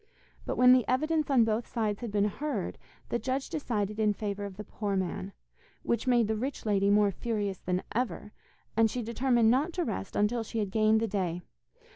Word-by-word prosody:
But - - -2
when 250 0 +8
the 255 -1 +4
evidence 310 +4 +1
on 260 -4 +5
both 225 +1 -1
sides 215 -3 -1
had 235 -3 -5
been 205 0 +2
heard, 225 -1 -3 0.3
the 235 - 0
judge 265 +4 -2
decided 215 - -2
in 210 -1 +3
favour 205 -1 -4
of 195 -2 -8
the 210 - -5
poor 205 -1 -3
man, 190 +1 -2 0.5
which 235 - -1
made 240 -3 +4
the 220 - 0
rich 260 +5 -4
lady 200 -2 +2
more 205 0 +4
furious 205 -2 -3
than 180 0 -2
ever, 225 -3 -2 0.4
and 225 0 +4
she 245 +2 -3
determined 235 0 +2
not 290 +7 +1
to 350 -1 -1
rest 95 - -4
until 220 +3 +1
she 225 +1 -6
had 205 -3 -1
gained 220 +1 +3
the 225 - +1
day. 180 -4 -2
220 Hz, 200 wpm, -29 LUFS, 205-250 Hz, 0.5 s, when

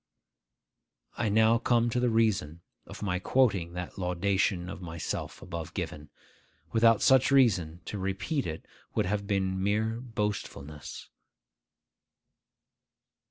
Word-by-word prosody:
I 115 - 0
now 110 +2 +4
come 120 0 +2
to 125 - 0
the 125 0 +2
reason 105 -8 +1 0.3
of - - -8
my 90 -3 0
quoting 95 -7 +2
that 90 +2 -6
laudation 90 0 0
of 95 - -7
myself 85 -2 -5
above 85 -2 -6
given. 75 0 -5 0.6
Without 115 -1 +4
such 130 -1 +5
reason, 90 - +3
to 105 - -5
repeat 95 - -2
it 80 0 -6 0.3
would - - +2
have 100 +1 -2
been 95 -2 0
mere 110 +3 0
boastfulness. 105 - -5
100 Hz, 115 wpm, -29 LUFS, 90-115 Hz, 0.6 s, such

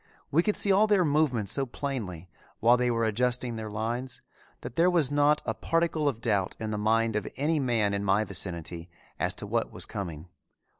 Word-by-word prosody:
We 160 - +4
could 210 +4 0
see 200 - +3
all 205 +3 +5
their 200 -4 +3
movements 140 - +1
so 135 -1 -1
plainly, 110 - -5 0.3
while 120 +2 +5
they 125 0 +1
were 115 -1 +1
adjusting 120 +2 0
their 110 -1 -5
lines, 115 +4 -3 0.4
that 125 0 -8
there 170 +4 +4
was 165 -6 +3
not 145 +1 +3
a - - -1
particle 165 -3 0
of 115 -4 -6
doubt 100 -5 0
in 110 -1 -3
the 105 - -2
mind 110 +1 +2
of 105 - -1
any 150 +3 +1
man 115 -6 +1
in 100 0 -1
my 100 +2 +3
vicinity 85 -4 -4 0.3
as - - -1
to - - -6
what - - -1
was - - -5
coming. 85 -4 -6
120 Hz, 200 wpm, -28 LUFS, 105-145 Hz, 0.4 s, all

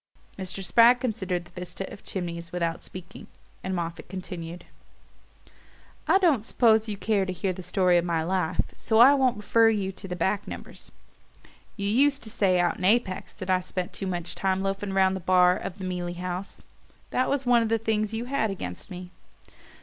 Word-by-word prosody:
Mr. 190 0 -5
Spragg 235 +4 +6
considered 190 -8 -2
the 175 - -18
vista 180 +2 -6
of - - -12
chimneys 170 -2 -5
without 170 -2 -2
speaking, 185 0 -8 0.4
and 190 0 -2
Moffatt 170 -1 -5
continued: 175 -2 -7 1.4
"I - - +6
don't 325 - +3
suppose 220 -2 +3
you 205 - -3
care 210 -1 +1
to 190 - -3
hear 185 +1 -2
the 185 - -8
story 180 -1 +3
of - - -2
my 165 -2 0
life, 180 -1 0
so 220 - 0
I 250 +5 +9
won't 260 -5 +2
refer 225 +2 +4
you 200 -3 -1
to 195 - -8
the 180 - -4
back 190 +4 -1
numbers. - - -9 0.9
You 200 - -3
used 275 +6 +3
to 220 - -3
say 185 -4 +2
out 175 -1 +1
in - - -7
Apex 195 -1 +1
that 185 -2 -4
I 185 - +4
spent 180 0 -5
too 195 - -4
much 175 -2 -3
time 190 0 0
loafing 195 0 -2
round 190 0 +3
the - - -3
bar 180 0 +4
of 185 - -6
the 190 - -6
Mealey 175 -1 -3
House; 180 +2 -5 0.5
that 255 - +1
was 275 -1 0
one 245 -1 +5
of 225 - -1
the 225 - +2
things 215 -1 -1
you 225 +2 -3
had 245 -4 0
against 90 - -6
me. 180 -1 -8
190 Hz, 195 wpm, -26 LUFS, 180-220 Hz, 1.4 s, I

